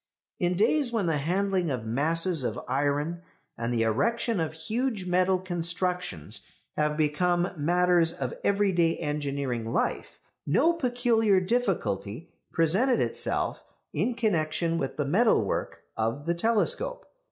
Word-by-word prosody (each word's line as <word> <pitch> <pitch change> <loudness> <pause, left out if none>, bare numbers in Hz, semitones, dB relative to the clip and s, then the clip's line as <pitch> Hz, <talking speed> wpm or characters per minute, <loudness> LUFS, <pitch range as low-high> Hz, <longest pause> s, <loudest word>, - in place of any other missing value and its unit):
In 180 -2 +1
days 245 +5 +3
when 225 -5 0
the 160 -3 +1
handling 185 +3 0
of 125 -5 -3
masses 160 +6 +1
of 120 0 -2
iron, 145 +5 -1 0.3
and 115 +1 -3
the 115 -2 +1
erection 230 - 0
of 160 -1 -2
huge 215 +5 -2
metal 185 +1 +2
constructions 180 - -2 0.3
have 150 0 0
become 175 +4 +1
matters 175 +1 +3
of 130 -6 -4
everyday 190 -5 +2
engineering 140 -5 -2
life, - - -2 0.3
no 310 - +3
peculiar 240 - +2
difficulty 180 - -2 0.2
presented 195 - +2
itself - - -1 0.3
in 245 - 0
connection 165 -6 0
with - - -3
the 145 - 0
metal 190 - +3
work - - -3
of 115 +6 -2
the 170 - +1
telescope. 230 - +1
175 Hz, 130 wpm, -27 LUFS, 145-200 Hz, 0.3 s, days